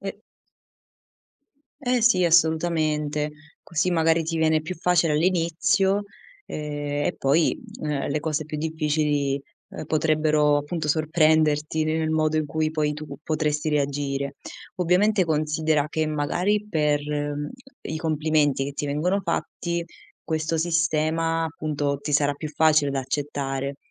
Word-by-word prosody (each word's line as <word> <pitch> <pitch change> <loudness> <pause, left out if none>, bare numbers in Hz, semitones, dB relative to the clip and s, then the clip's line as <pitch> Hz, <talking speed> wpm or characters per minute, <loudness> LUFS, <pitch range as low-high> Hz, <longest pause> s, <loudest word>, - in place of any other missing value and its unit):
E 200 +1 -6 1.6
Eh 250 -2 +1
sì 220 -6 +4
assolutamente, 155 -3 +2 0.3
così 175 +2 0
magari 165 0 +2
ti 165 +1 -2
viene 160 -1 +3
più 180 +3 -5
facile 175 -2 +2
all'inizio, 180 +4 +2 0.4
ehm, 145 -1 -3
e - - -1
poi, 145 +4 +2 0.2
ehm, 150 -2 -2
le 150 - 0
cose 155 0 -2
più 155 0 -6
difficili, 150 -3 0 0.3
ehm, - - -7
potrebbero 155 -1 +2
appunto 150 +2 -3
sorprenderti 155 0 +2
nel 155 0 0
modo 155 0 +1
in 155 -1 0
cui 155 +1 -1
poi 150 -1 0
tu 155 0 -7 0.2
potresti 155 -1 -1
reagire. 140 -1 -1 0.4
Ovviamente 185 +3 +3
considera 155 -1 +1
che 160 0 -1
magari 180 +8 0
per 150 -5 +1 0.8
i 155 - -4
complimenti 155 -3 +1
che 140 - -4
ti 145 - -4
vengono 165 +8 0
fatti 170 0 -2 0.4
questo 160 0 -1
sistema, 165 0 +1
appunto, 145 -3 -2
ti 150 +1 -5
sarà 145 0 +3
più 155 +1 -6
facile 155 -1 +3
da 135 - -1
accettare. 135 0 -3
155 Hz, 130 wpm, -24 LUFS, 150-165 Hz, 1.6 s, sì